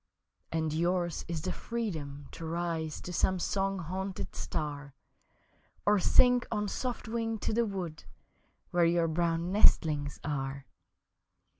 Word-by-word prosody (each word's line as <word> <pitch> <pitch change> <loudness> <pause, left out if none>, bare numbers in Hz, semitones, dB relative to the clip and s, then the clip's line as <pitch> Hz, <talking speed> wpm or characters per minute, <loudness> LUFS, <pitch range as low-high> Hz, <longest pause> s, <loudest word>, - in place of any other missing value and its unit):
And 160 -2 0
yours 175 +1 0
is 165 -2 -3
the 185 - -1
freedom 155 - -4
to - - -9
rise 165 -1 -2
To 180 - -6
some 185 +2 +2
song 195 +2 0
haunted 190 +2 -4
star 145 -3 -4 0.9
Or 205 0 +5
sink 245 +5 +5
on 210 -2 0
soft 250 0 -3
wing 225 0 -1
to 215 - -2
the 235 +1 +2
wood 175 - -5 0.7
Where 175 -1 +3
your 170 0 +3
brown 170 +1 0
nestlings 150 -7 +4
are. 135 -2 -3
170 Hz, 130 wpm, -31 LUFS, 155-195 Hz, 0.9 s, Or